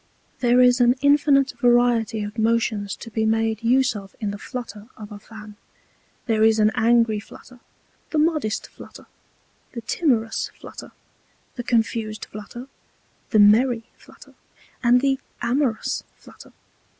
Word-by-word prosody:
There 245 0 +3
is 250 0 +4
an 245 +1 +4
infinite 285 -1 +3
variety 240 -3 +2
of 210 +2 -7
Motions 220 -3 0
to 230 - -11
be 220 0 -1
made 220 0 0
use 250 +1 +2
of 195 -2 -10
in 210 -3 -3
the 205 - -8
Flutter 225 -5 -8
of 215 0 -10
a 205 - -9
Fan. 210 -1 -13 0.7
There 220 -2 +1
is 220 0 +4
an 215 0 +3
Angry 230 -1 +2
Flutter, 250 +3 -15 0.5
the 315 - -3
modest 300 -8 0
Flutter, - - -14 0.7
the 235 - -6
timorous 225 -3 -1
Flutter, - - -11 0.6
the 245 - -5
confused 225 -2 -1
Flutter, 215 +4 -10 0.6
the - - +1
merry 225 +3 +4
Flutter, - - -18 0.5
and 245 0 +4
the 270 -1 +1 0.2
amorous 245 -2 -1
Flutter. - - -16
230 Hz, 140 wpm, -22 LUFS, 215-250 Hz, 0.7 s, is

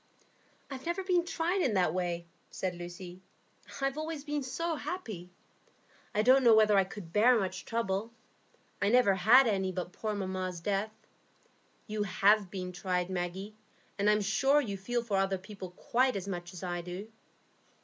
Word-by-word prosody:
"I've 265 +4 -7
never 345 +3 -1
been 360 -2 +2
tried 345 +3 0
in 245 -10 +1
that 180 -4 +2
way," 175 -2 -2 0.2
said 185 -2 -3
Lucy. 175 +1 -9 0.6
"I've 275 +2 0
always 310 -2 -4
been 295 -1 -2
so 315 +6 -2
happy. 220 - -6 0.9
I 210 - +3
don't 260 +3 +6
know 230 -2 +7
whether 215 -1 +5
I 195 -1 +4
could 185 -4 -10
bear 235 +4 +5
much 185 -3 -3
trouble; 225 -1 -2 0.7
I 200 - +3
never 245 -4 +5
had 220 +8 +6
any 190 -4 0
but 180 -1 -5
poor 215 0 -3
mamma's 185 -2 -3
death. 200 +4 -1 1.0
You 215 -1 -3
have 205 0 +3
been 185 -1 -5
tried, 180 0 -2
Maggie; 185 +3 -4 0.5
and 205 +1 +3
I'm 210 0 +3
sure 245 +9 +3
you 215 -9 -2
feel 235 +5 -2
for 210 -4 -1
other 195 0 +1
people 190 0 -9
quite 250 +7 +1
as 195 -1 -4
much 175 -2 -5
as 180 -1 -9
I 175 -1 -2
do." 180 +5 -7
200 Hz, 170 wpm, -31 LUFS, 185-245 Hz, 1.0 s, know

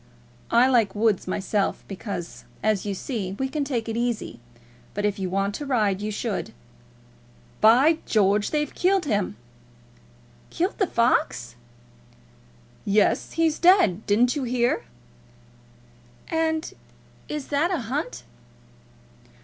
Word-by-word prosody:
I 235 +2 +5
like 230 -7 +2
woods 210 -3 +1
myself, 195 +2 -1
because, 195 -3 -6 0.2
as 215 -1 +1
you 200 - -2
say, 195 -4 -4
we 265 +7 -2
can 285 +2 -2
take 245 -5 -2
it 225 - -3
easy; 235 - -2 0.6
but 205 +1 -1
if 205 -1 -1
you 190 -1 -2
want 195 +2 0
to 290 - -5
ride, 210 -7 +1
you 210 - -2
should 215 0 -3 1.1
By 265 +9 +6
George, 205 -1 +2
they've 300 -1 -1
killed 375 -1 +2
him!" 205 - -1 1.1
"Killed 365 +7 -2
the 390 - +2
fox?" 230 - +1 1.3
"Yes; 205 +1 +2
he's 325 -2 +1
dead. 340 - +4
Didn't 240 +6 +3
you 290 - -2
hear?" 245 -1 0 1.4
"And 320 0 -1 0.6
is 300 -2 -5
that 295 +4 +1
a 350 -7 -1
hunt?" 265 +8 -4
230 Hz, 125 wpm, -24 LUFS, 205-290 Hz, 1.4 s, By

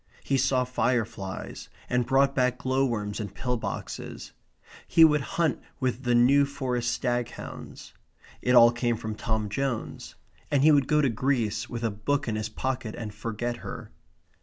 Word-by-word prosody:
He 135 - 0
saw 130 0 +2
fire 125 -2 +1
flies, 95 -4 -7 0.2
and 125 -1 0
brought 135 +1 +3
back 125 -1 +1
glow 130 +2 +1
worms 105 -3 -3
in 105 -2 -4
pill 125 +6 -2
boxes. 115 - -6 0.6
He 165 - +7
would 150 -2 +3 0.2
hunt 165 -4 +1 0.2
with 130 -1 -1
the 120 0 +3
New 135 +4 +5
Forest 125 -3 -2
Staghounds. 120 -1 -4 0.5
It 125 +1 +2
all 120 -1 +8
came 120 -1 0
from 110 0 -4
Tom 110 0 -2
Jones; 125 +3 -3 0.3
and 140 -2 +2
he 155 - +7
would 140 -3 +4
go 150 0 +3
to 140 - +3
Greece 115 -2 -1
with 120 -1 -5
a 115 - +1
book 120 +8 -1
in 110 - -1
his 110 0 -3
pocket 125 -1 -3
and 110 -3 -6
forget 115 +3 -3
her. - - -8
125 Hz, 170 wpm, -27 LUFS, 110-135 Hz, 0.6 s, all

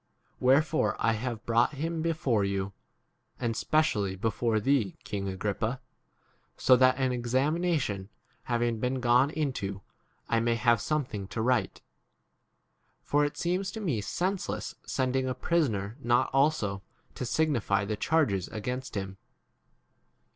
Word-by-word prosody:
Where 135 +4 +5
fore 155 0 0
I 115 - +2
have 115 0 -4
brought 115 +4 +3
him 160 +3 -2
before 155 -10 +1
you, 100 0 -2 0.7
and 115 -2 -1
specially 110 -8 +1
before 110 +2 0
thee, 115 -4 +1
king 100 -2 -4
Agrippa, 105 +6 -2 0.8
so 130 - +6
that 130 0 +4
an 130 -1 +1
examination 130 - 0 0.4
having 120 -2 0
been 125 +3 -1
gone 125 +2 +4
into 125 -11 -3 0.4
I 115 - +2
may 115 0 +1
have 120 0 +3
2? - - -6
something 120 -8 -2
to 110 - -4
write: 120 -6 0 1.2
for 145 +1 +2
it 145 - -4
seems. 180 +3 -1
to - - -5
me 150 - -1
senseless 185 - -2
sending 130 0 0
a 130 - -2
prisoner 115 - 0
not 120 -2 +2
also 135 -9 +2 0.3
to - - -5
signify 120 -7 +1
the 105 +1 -2
charges 105 - +1
against 125 +3 -5
him. 95 -1 -4
120 Hz, 135 wpm, -29 LUFS, 105-145 Hz, 1.2 s, so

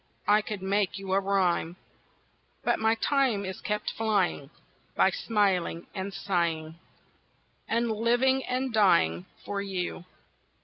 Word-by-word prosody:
I 210 +1 +5
could 210 -2 -6
make 200 0 0
you 195 -1 -4
a 195 - +4
rhyme. 185 -4 +1 0.9
But - - +1
my 220 +1 +3
time 250 -5 +1
is 190 -1 -6
kept 210 0 -2
flying 200 -10 0 0.5
By - - +4
smiling 200 - 0
and 190 +1 -4
sighing 170 -4 -2 0.9
And 230 0 0
living 240 +4 +2
and 255 0 -2
dying 90 - +3 0.2
for 200 -1 -3
you. 185 -2 -4
200 Hz, 125 wpm, -28 LUFS, 180-220 Hz, 0.9 s, I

